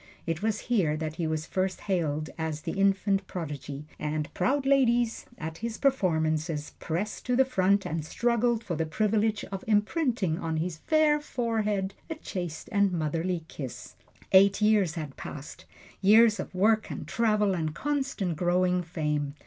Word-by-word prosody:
It 165 -1 -2
was 215 -1 0
here 180 -11 +1
that 155 0 -4
he 165 - -1
was 155 0 -2
first 185 +1 -2
hailed 155 -5 -1
as 160 -2 -3
the - - -3
infant 195 0 +1
prodigy, 145 -4 -6
and 150 0 -3
proud 275 +1 +1
ladies, 245 -4 +2
at 160 0 -6
his 230 -1 -4
performances, 160 - 0
pressed 185 +7 -3
to 250 - +2
the 265 +1 +5
front 200 -5 +2
and 160 0 -2
struggled 235 +5 +1
for 180 -6 -3
the 160 +1 -1
privilege 215 +4 +1
of 195 -1 -5
imprinting 210 - +1
on 160 -1 -2
his 165 0 -2
fair 305 - +3
forehead 215 -7 -1 0.2
a 320 - -3
chaste 175 - -5
and 200 -2 +3
motherly 165 +1 -1
kiss. 135 -6 -8 0.4
Eight 195 +1 +6
years 210 -5 +3
had 150 -5 -6
passed: 145 0 -8 0.4
years 215 +2 +6
of - - -6
work 215 +3 +3
and - - -6
travel 210 -3 +2
and 160 -3 -2
constant 270 - -1
growing 180 +2 +2
fame. 150 -4 -2
190 Hz, 155 wpm, -28 LUFS, 160-220 Hz, 0.4 s, Eight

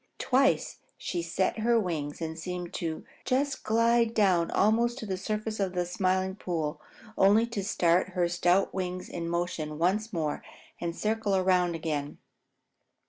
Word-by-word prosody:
Twice 270 +1 +2 0.2
she 175 - -3
set 175 +5 -1
her 230 +1 +3
wings 160 -6 -3
and 160 0 -3
seemed 180 +1 -5
to 160 -2 -4 0.2
just 275 +2 0
slide 230 +1 +3
down 185 -6 +3
almost 235 +4 +2
to 230 - -6
the 190 -2 -2
surface 215 +3 -3
of 190 -2 0
the 180 -1 0
Smiling 185 0 0
Pool, 160 -5 -3 0.4
only 205 +4 +5
to 230 -4 -4
start 180 -2 +2
her 180 -2 +2
stout 175 +2 +2
wings 185 -1 -3
in 170 -1 -4
motion 170 -3 -2
once 200 +7 +1
more 155 -4 -2 0.4
and 170 -1 -3
circle 215 -2 0
around 180 -2 +2
again. 150 -3 -3
185 Hz, 150 wpm, -28 LUFS, 170-215 Hz, 0.4 s, only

